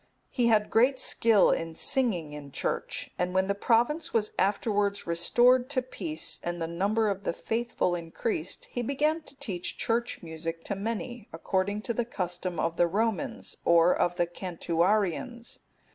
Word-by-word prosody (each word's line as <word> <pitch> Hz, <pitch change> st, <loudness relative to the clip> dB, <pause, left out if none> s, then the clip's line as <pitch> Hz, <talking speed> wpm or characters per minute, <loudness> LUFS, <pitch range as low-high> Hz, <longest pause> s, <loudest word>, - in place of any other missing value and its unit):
He 245 Hz, -2 st, +2 dB
had 215 Hz, -2 st, +3 dB
great 255 Hz, +4 st, +4 dB
skill 225 Hz, -5 st, +4 dB
in 165 Hz, -1 st, -2 dB
singing 185 Hz, -, 0 dB
in 145 Hz, -1 st, -9 dB
church, -, -, -3 dB
and 180 Hz, +1 st, -1 dB
when 190 Hz, 0 st, +3 dB
the 200 Hz, -, +1 dB
province 245 Hz, +11 st, +1 dB
was 215 Hz, -2 st, +1 dB
afterwards 200 Hz, 0 st, +1 dB
restored 245 Hz, +10 st, +4 dB
to 260 Hz, -3 st, 0 dB
peace, 165 Hz, -10 st, -3 dB
and 175 Hz, 0 st, -3 dB
the 165 Hz, -, -1 dB
number 200 Hz, +7 st, +1 dB
of 200 Hz, -1 st, -2 dB
the -, -, -1 dB
faithful 230 Hz, -4 st, -1 dB
increased, 170 Hz, +1 st, -3 dB
he 245 Hz, -, -2 dB
began 300 Hz, +6 st, +1 dB
to 280 Hz, -, -10 dB
teach 180 Hz, -8 st, -3 dB
church 235 Hz, -2 st, -1 dB
music 165 Hz, 0 st, -5 dB
to -, -, -3 dB
many, 225 Hz, +2 st, -4 dB
according 190 Hz, +5 st, -1 dB
to 235 Hz, -, -1 dB
the 240 Hz, -, 0 dB
custom 180 Hz, -5 st, -3 dB
of 165 Hz, +1 st, -1 dB
the 175 Hz, -, +4 dB
Romans, 210 Hz, +1 st, -2 dB
or 170 Hz, +1 st, +5 dB
of 175 Hz, 0 st, +1 dB
the 175 Hz, -, +3 dB
Cantuarians. 185 Hz, +7 st, -1 dB
200 Hz, 160 wpm, -28 LUFS, 170-235 Hz, -, or